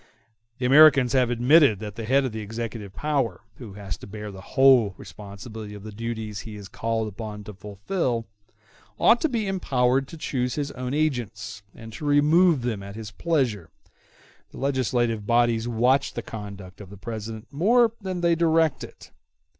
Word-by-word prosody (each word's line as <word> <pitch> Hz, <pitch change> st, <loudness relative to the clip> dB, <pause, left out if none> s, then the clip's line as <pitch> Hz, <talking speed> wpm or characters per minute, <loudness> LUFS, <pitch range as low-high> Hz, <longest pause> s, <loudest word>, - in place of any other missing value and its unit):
The 125 Hz, -, -3 dB
Americans 135 Hz, -2 st, +6 dB
have 130 Hz, -2 st, +3 dB
admitted 125 Hz, 0 st, +5 dB
that 105 Hz, 0 st, -7 dB
the 115 Hz, +2 st, -6 dB
head 135 Hz, +4 st, +3 dB
of 130 Hz, -, -2 dB
the 110 Hz, -, -5 dB
executive 110 Hz, -1 st, -6 dB
power, 145 Hz, -6 st, -1 dB, 0.2 s
who 115 Hz, -6 st, -10 dB
has 100 Hz, -4 st, -6 dB
to -, -, -11 dB
bear 105 Hz, 0 st, -7 dB
the 95 Hz, -1 st, -10 dB
whole 125 Hz, -4 st, +4 dB
responsibility 105 Hz, +1 st, -9 dB
of 100 Hz, -, -10 dB
the 110 Hz, -, -8 dB
duties 110 Hz, -1 st, -5 dB
he 110 Hz, +1 st, -8 dB
is 100 Hz, -2 st, -9 dB
called 115 Hz, +1 st, -2 dB
upon 105 Hz, 0 st, -7 dB
to 105 Hz, -, -9 dB
fulfil, 115 Hz, -, -3 dB, 0.7 s
ought 235 Hz, -, +4 dB
to 320 Hz, -, +2 dB
be 230 Hz, -5 st, -1 dB
empowered 135 Hz, -8 st, +1 dB
to 165 Hz, -, -10 dB
choose 125 Hz, -5 st, -2 dB
his 145 Hz, -1 st, -3 dB
own 125 Hz, +2 st, -4 dB
agents, 115 Hz, -9 st, -2 dB
and 115 Hz, 0 st, -11 dB
to 125 Hz, -, -7 dB
remove 150 Hz, +1 st, +4 dB
them 115 Hz, -5 st, -2 dB
at 100 Hz, +1 st, -9 dB, 0.2 s
pleasure: 125 Hz, -, 0 dB, 0.8 s
the -, -, -13 dB
legislative 120 Hz, -5 st, 0 dB
bodies 120 Hz, -1 st, +2 dB
watch 125 Hz, +4 st, +2 dB
the -, -, -4 dB
conduct 100 Hz, -3 st, -9 dB
of 100 Hz, -, -11 dB
the 100 Hz, -, -11 dB
President 110 Hz, +3 st, -7 dB
more 225 Hz, -, +4 dB
than 185 Hz, -2 st, -4 dB
they 170 Hz, -1 st, +3 dB
direct 165 Hz, -2 st, +2 dB
it. -, -, -12 dB
120 Hz, 170 wpm, -25 LUFS, 105-140 Hz, 0.8 s, Americans